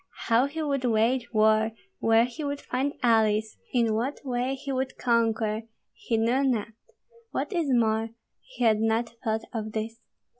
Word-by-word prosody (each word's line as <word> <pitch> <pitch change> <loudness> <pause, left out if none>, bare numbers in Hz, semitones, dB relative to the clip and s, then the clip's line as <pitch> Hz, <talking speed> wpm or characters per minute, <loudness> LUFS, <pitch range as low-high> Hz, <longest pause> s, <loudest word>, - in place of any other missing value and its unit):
How 235 +4 +4
he 315 +3 -4
would 280 -3 -1
wage 240 +1 +1
war, 220 0 +3 0.3
where 225 +1 +4
he 250 +6 -7
would 285 0 -2
find 275 +2 -2
allies, 220 -2 +2
in 230 -3 +2
what 245 +6 -1
way 250 +1 -1
he 275 +1 -6
would 265 0 -2
conquer, 225 -2 +1 0.3
he 230 - -2
knew 240 +5 +2
not, 235 -5 0 0.6
what - - -3
is 335 -5 0
more, 225 -2 +2 0.3
he - - -7
had 220 -2 +4
not 225 +1 +1
thought 220 -1 -1
of 215 -2 -4
this. 225 +1 -4
230 Hz, 160 wpm, -27 LUFS, 220-260 Hz, 0.6 s, How